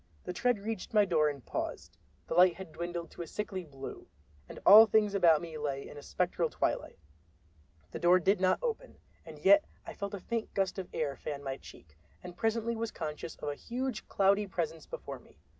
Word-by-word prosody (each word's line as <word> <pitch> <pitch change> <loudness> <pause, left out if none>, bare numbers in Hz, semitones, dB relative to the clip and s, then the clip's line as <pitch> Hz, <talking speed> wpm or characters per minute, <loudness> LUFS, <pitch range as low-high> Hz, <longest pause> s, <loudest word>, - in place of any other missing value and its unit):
The 180 - -5
tread 245 +4 +1
reached 215 +1 -5
my 210 - +7
very 200 - 0
door 155 -3 +3
and 140 -3 -8
paused—the 70 - -6
light 180 +1 +6
had 190 -4 -9
dwindled 170 0 -5
to - - -9
a 170 - -6
sickly 195 -2 -4
blue, 135 -4 -9 0.4
and - - -9
all 220 +3 +10
things 215 -2 +3
about 170 -5 +4
me 160 -2 -7
lay 140 -2 -3
in - - -11
a 145 - -9
spectral 175 0 -1
twilight. - - -2 0.9
The - - -5
door 175 +1 +6
did 190 +2 +2
not 185 0 +3
open, - - -3 0.3
and 155 -1 -9
yet 200 +6 +6 0.2
I - - -7
felt 200 0 -5
a - - -7
faint 230 +4 -4
gust 195 0 0
of 185 - -6
air 145 -3 -2
fan 145 -2 -6
my 135 -1 -4
cheek, 80 - -15 0.3
and 180 -1 -9
presently 230 +2 0
was 225 0 -2
conscious 155 -2 -6
of 150 - -5
a - - -2
huge, 245 - -4
cloudy 200 +1 +2
presence 450 - -4
before - - -7
me. - - -22
185 Hz, 205 wpm, -31 LUFS, 155-210 Hz, 0.9 s, all